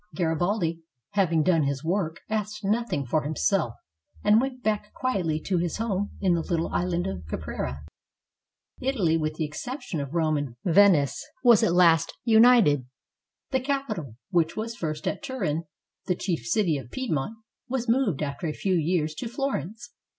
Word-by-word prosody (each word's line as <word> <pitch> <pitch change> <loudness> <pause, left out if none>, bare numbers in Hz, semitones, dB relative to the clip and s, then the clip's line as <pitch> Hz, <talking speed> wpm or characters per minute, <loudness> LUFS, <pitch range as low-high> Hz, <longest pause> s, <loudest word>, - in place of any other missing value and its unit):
Garibaldi 170 0 0 0.3
having 170 -6 +2
done 170 -2 +3
his 140 0 -1
work, 170 -1 -1
asked 210 -1 -3
nothing 210 - 0
for 155 +5 +1
himself, 145 - 0 0.5
and 210 +2 +5
went 255 -1 -4
back 210 -1 -1
quietly 180 -12 -1
to 185 0 0
his 170 -1 -1
home 205 -3 -1
in 185 -3 +2
the 170 - +1
little 165 0 -1
island 175 -1 -1
of 95 -2 -4
Caprera. 70 -1 -4 0.9
Italy, 215 -12 +1
with 155 -1 -1
the 155 - -1
exception 170 - -5
of 140 +3 -5
Rome 155 -2 +2
and 140 -5 -4
Venice, 175 -6 +4 0.2
was 240 -4 +7
at 170 - +3
last 165 -2 +4
united. 220 - +5 0.6
The 265 - +2
capital, 250 - -3 0.2
which 170 -3 +1
was 230 +1 -3
first 155 -6 -4
at - - -2
Turin, 165 - -2 0.4
the 180 - +2
chief 170 -11 -3
city 165 - +2
of 120 -3 -11
Piedmont, 220 - -2 0.3
was 250 -1 -2
moved 230 - +2
after 140 +3 -3
a 155 - -2
few 190 +3 -1
years 160 -2 +1
to 235 - -5
Florence. 240 - -3
175 Hz, 160 wpm, -26 LUFS, 155-220 Hz, 0.9 s, was